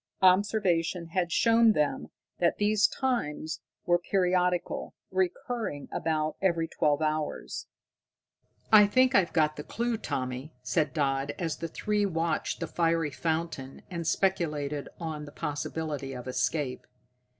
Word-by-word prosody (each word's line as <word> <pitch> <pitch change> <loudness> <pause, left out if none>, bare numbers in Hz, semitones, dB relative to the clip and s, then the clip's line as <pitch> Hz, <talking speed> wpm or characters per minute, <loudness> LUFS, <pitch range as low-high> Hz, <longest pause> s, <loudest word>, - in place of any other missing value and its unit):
Observation 185 -3 +3
had 175 0 0
shown 230 +2 +5
them 150 -4 0 0.3
that 170 - +2
these 210 +1 +4
times 160 - -2 0.2
were 175 0 +3
periodical, 180 -1 0 0.2
recurring 185 - -2
about 155 -1 -1
every 170 -4 +2
twelve 150 -1 +1
hours. 155 0 -2 1.1
"I 210 -1 +9
think 255 +4 +4
I've 190 -6 +4
got 155 -2 +2
the 150 - -5
clue, 235 +5 -1
Tommy," 130 - -4
said 150 +5 +1
Dodd, 140 -1 0
as 165 -3 -2
the 165 - -4
three 210 +5 0
watched 165 -3 -1
the - - -1
fiery 165 -3 +1
fountain 160 -4 -3
and 170 -2 -3
speculated 150 -5 0
on 155 -3 -4
the 145 - -10
possibility 145 -1 -3
of 125 0 -7
escape. 130 +2 -1
165 Hz, 130 wpm, -29 LUFS, 150-185 Hz, 1.1 s, I